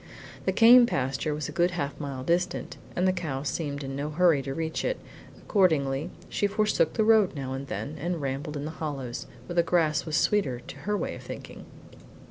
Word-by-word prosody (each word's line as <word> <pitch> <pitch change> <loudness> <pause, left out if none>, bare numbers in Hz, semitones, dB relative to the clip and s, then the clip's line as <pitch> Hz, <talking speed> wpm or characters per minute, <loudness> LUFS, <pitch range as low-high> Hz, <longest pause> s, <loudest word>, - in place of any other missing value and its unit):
The - - +3
Came 240 +1 +8
pasture 135 - -1
was 150 -1 -3
a - - -6
good 175 0 +2
half 140 -2 -3
mile 135 -3 -5
distant, 175 +5 -1 0.2
and 180 +1 +2
the 185 - +3
cow 150 -7 -3
seemed 145 -1 -3
in 135 0 -5
no 145 +2 -3
hurry 165 -2 +4
to 135 - -5
reach 160 -1 -2
it; - - -1 0.4
accordingly 150 -8 +1 0.2
she 205 - 0
forsook 210 +1 +1
the 220 - +2
road 215 -5 +4
now 135 -2 -4
and 135 +1 -5
then, 150 +3 -5
and 175 +3 -2
rambled 145 +2 -3
in 145 - -4
the 155 - -4
hollows, 140 -6 -5 0.2
where 175 - -6
the 170 - +5
grass 165 -3 +2
was 155 - -1
sweeter 165 -13 +2
to - - -10
her 210 - +2
way - - -3
of - - -9
thinking. - - -9
155 Hz, 205 wpm, -27 LUFS, 140-180 Hz, 0.4 s, Came